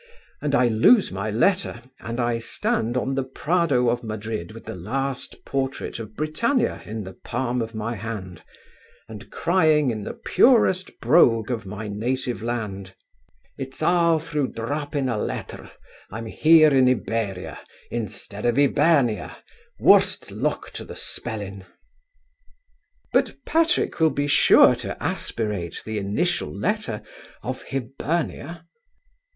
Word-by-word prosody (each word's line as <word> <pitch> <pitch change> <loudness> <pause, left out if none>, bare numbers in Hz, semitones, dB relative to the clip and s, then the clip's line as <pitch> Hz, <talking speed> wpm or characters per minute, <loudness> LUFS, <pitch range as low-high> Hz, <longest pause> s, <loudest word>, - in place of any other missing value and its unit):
And 145 -1 0
I 125 -2 +4
lose 120 - +5
my 100 +3 -3
letter, 125 - +1 0.2
and 115 +1 -5
I 120 -1 0
stand 115 +1 -1
on 135 +2 -1
the 135 0 0
Prado 140 -1 +1
of 120 +1 -1
Madrid 110 -4 -5
with 115 +1 -12
the - - -5
last 130 +9 -4
portrait 135 -3 -3
of 110 -2 -8
Britannia 230 - 0
in 110 0 -5
the 95 0 -9
palm 125 +5 -2
of 115 0 -5
my 110 +2 -3
hand, 100 -5 -6 0.7
and 110 -2 -10
crying 155 -6 +2
in 110 -2 -4
the - - -6
purest 215 -7 +3
brogue 115 -7 +4
of 110 -5 -3
my 105 +2 -6
native 120 +4 -2
land: 105 -5 -4 0.6
'It's 135 0 -5
all 170 -2 +4
through 150 -3 -2
dropping 145 +4 -2
a 115 -4 -1
letter - - -5 0.4
I'm 115 +2 -6
here 155 +5 +5
in 130 -1 +5
Iberia 110 -6 -2 0.3
instead 105 -2 -5
of 120 +1 +1
Hibernia, 140 -4 +2 0.4
worse - - +4
luck - - -2
to - - -7
the - - -10
spelling!'" 100 -4 -5 1.5
"But - - +2
Patrick 330 - +1
will 160 -1 +5
be 145 -1 -1
sure 145 - +6
to - - -5
aspirate 105 -7 -3
the 110 -1 -3
initial 105 - -1
letter - - -2 0.4
of - - -4
Hibernia." 155 +5 -3
120 Hz, 135 wpm, -24 LUFS, 110-150 Hz, 1.5 s, sure